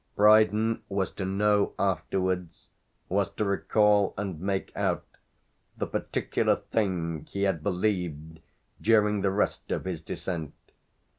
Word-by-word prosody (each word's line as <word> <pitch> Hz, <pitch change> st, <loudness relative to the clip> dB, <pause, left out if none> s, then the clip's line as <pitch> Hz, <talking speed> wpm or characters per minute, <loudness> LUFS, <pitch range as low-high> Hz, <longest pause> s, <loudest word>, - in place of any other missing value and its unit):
Brydon 110 Hz, +1 st, +4 dB
was 95 Hz, -1 st, -1 dB
to 95 Hz, -, -5 dB
know 100 Hz, +1 st, +2 dB
afterwards, 90 Hz, -3 st, -1 dB, 0.4 s
was 95 Hz, 0 st, 0 dB
to 105 Hz, -, -1 dB
recall 105 Hz, 0 st, +2 dB
and 95 Hz, -5 st, -4 dB
make 95 Hz, 0 st, -2 dB
out, -, -, 0 dB, 0.7 s
the -, -, -1 dB
particular -, -, 0 dB
thing 85 Hz, -7 st, -2 dB
he 100 Hz, -, -2 dB
had 95 Hz, -5 st, +1 dB
believed 90 Hz, -5 st, -2 dB, 0.4 s
during 105 Hz, -2 st, +3 dB
the 100 Hz, -, +2 dB
rest 100 Hz, +2 st, -1 dB
of -, -, -2 dB
his 90 Hz, -4 st, -3 dB
descent. 80 Hz, -1 st, -5 dB
95 Hz, 125 wpm, -28 LUFS, 90-105 Hz, 0.7 s, Brydon